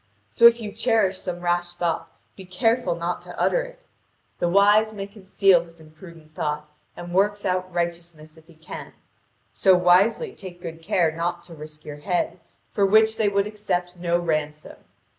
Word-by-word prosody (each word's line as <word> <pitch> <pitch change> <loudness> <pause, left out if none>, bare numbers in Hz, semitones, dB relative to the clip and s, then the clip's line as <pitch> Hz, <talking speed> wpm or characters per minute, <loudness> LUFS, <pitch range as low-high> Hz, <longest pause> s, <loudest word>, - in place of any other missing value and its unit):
So 235 - +7
if 235 0 +4
you 215 -2 -6
cherish 215 -4 +1
some 175 -1 -5
rash 175 0 -1
thought 170 -2 -2 0.3
be 190 - -10
careful 185 +1 0
not 170 +1 -3
to - - -10
utter - - +2
it. - - -11 0.5
The 175 - +1
wise 205 +3 +4
man 200 -2 -7
conceals 195 -3 +2
his 165 0 -19
imprudent 160 0 -15
thought 150 0 -3 0.3
and 175 0 -8
works 205 +2 +1
out 185 0 -1
righteousness 170 -2 -4
if 160 0 -19
he 170 - -18
can. 160 - -10 0.6
So 190 -2 +4
wisely 185 - +3
take 180 -2 -10
good 165 -2 -8
care 165 0 +1
not 170 +2 -3
to 170 - -12
risk 155 -1 -11
your 150 -1 -7
head, 175 +4 -2 0.3
for 205 - 0
which 220 +2 +4
they 215 -2 +2
would 200 0 +1
accept 180 -4 -3
no 175 -1 0
ransom. 155 -3 -3
180 Hz, 175 wpm, -24 LUFS, 170-205 Hz, 0.6 s, So